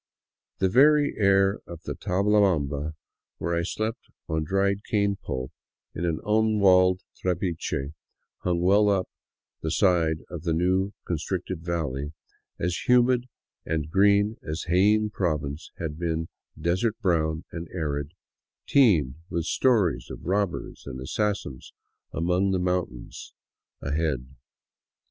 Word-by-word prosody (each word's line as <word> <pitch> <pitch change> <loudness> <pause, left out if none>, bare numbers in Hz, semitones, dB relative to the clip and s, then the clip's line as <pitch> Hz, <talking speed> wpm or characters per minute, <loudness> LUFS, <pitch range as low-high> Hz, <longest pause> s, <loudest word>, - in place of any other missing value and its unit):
The 95 - +2
very 145 +7 +5
air 100 -1 +4
of 85 -2 -9
Tablabamba, 90 -7 +1 0.4
where 85 +1 -2
I 85 - +1
slept 110 +6 -3 0.2
on 80 0 -1
dried 100 +4 0
cane 100 -2 +1
pulp 65 -8 -5 0.4
in 85 - -3
an 80 -2 0
unwalled 100 -4 +4
trapiche 85 -6 -2 0.5
hung 85 -1 0
well 100 +3 +4
up 95 -2 +1 0.5
the 80 - -2
side 80 -2 +2
of 85 -1 -7
the 85 0 0
new 95 +4 +1
constricted 90 +2 -3
valley, 75 -4 -3 0.5
as 90 +1 -2
humid 125 0 +4 0.3
and 80 -1 -2
green 100 +3 +4
as 80 +2 -4
Jaen 105 +4 +3
Province 75 -4 -2
had 80 -2 -5
been 80 -1 -2 0.3
desert 95 +8 0
brown 80 -6 +1
and 85 0 -6
arid, 75 -2 -3 0.5
teemed 85 - +4
with 85 -1 -2
stories 110 -9 +2
of - - -9
robbers 100 -4 -2
and 65 -2 -6
assassins 95 -1 -3 0.4
among 90 +4 +1
the 95 - +1
moun 90 0 +1
tain 60 - -14
defiles - - -11 0.5
ahead. 70 -3 -2
90 Hz, 125 wpm, -26 LUFS, 80-100 Hz, 0.5 s, very